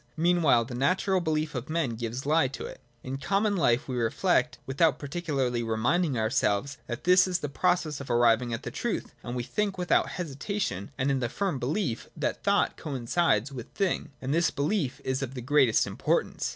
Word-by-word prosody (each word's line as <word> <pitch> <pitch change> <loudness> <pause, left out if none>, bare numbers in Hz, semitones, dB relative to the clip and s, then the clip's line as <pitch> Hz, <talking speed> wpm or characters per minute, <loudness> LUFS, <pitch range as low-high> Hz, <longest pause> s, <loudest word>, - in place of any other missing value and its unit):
Meanwhile 160 -8 +3
the 125 - -8
natural 185 +8 +1
belief 155 -2 -1
of 125 0 -5
men 160 -5 0
gives 115 +3 -4
the 145 - -3
lie 155 -3 +4
to 135 - -7
it. - - -9 0.2
In 135 +1 -4
common 200 +6 +1
life 125 -9 +2
we 130 - -3
reflect, 115 -2 +1
without 140 +3 +2
particularly 140 -5 -2
reminding 120 +7 +1
our 110 0 0
selves 135 0 0
that 120 0 -5
this 180 +1 +5
is 180 -1 +1
the 150 -5 -4
process 155 -1 0
of 140 - -9
arriving 120 0 +3
at 115 - -4
the - - -5
truth, - - -3
and 120 - -5
we 120 - -2
think 200 - -2
without 180 -1 +2
hesitation, 145 - -3
and 135 +1 +1
in 135 - +1
the 120 -2 -1
firm 190 - -2
belief 135 - -2
that - - -2
thought - - +2
coincides 135 -2 0
with 125 -4 -8
thing. 195 -3 -1
And 135 +2 -1
this 165 +1 +3
belief 145 -2 -1
is 130 +1 -1
of 135 -1 -4
the - - -4
greatest 135 -2 +3
importance. - - -1
140 Hz, 195 wpm, -28 LUFS, 120-170 Hz, 0.2 s, this